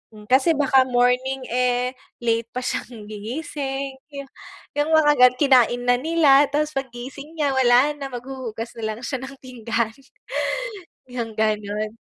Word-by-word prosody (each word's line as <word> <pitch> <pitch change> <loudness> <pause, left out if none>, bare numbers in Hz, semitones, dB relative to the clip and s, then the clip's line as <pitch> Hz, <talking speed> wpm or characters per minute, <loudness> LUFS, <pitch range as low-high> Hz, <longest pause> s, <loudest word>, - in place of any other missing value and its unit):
Mm, 210 0 -14
kasi 265 +6 +5
baka 270 -2 +4
morning, 250 +2 +1
eh, 250 0 +1 0.3
late 230 -1 +1
pa 250 - -3
siyang 225 -4 -5
gigising, 270 +4 -5 0.8
yung 295 +2 +1
mga 310 -2 +6
ganu 250 0 +7
kinain 250 -3 +4
na 245 0 +3
nila 295 -1 +5
tapos 300 +1 +1
pag 270 -2 -3
gising 275 +5 -9
niya 300 -3 +1
wala 260 +2 +4
na, 280 -1 -5
maghuhugas 245 -2 -6
na 220 -1 -2
lang 230 - -12
siya 265 - -2
ng 265 +1 -7
pinggan. 235 -3 -2 1.2
Yung 235 -3 -4
ganun. 215 0 -1
250 Hz, 145 wpm, -23 LUFS, 235-275 Hz, 1.2 s, ganu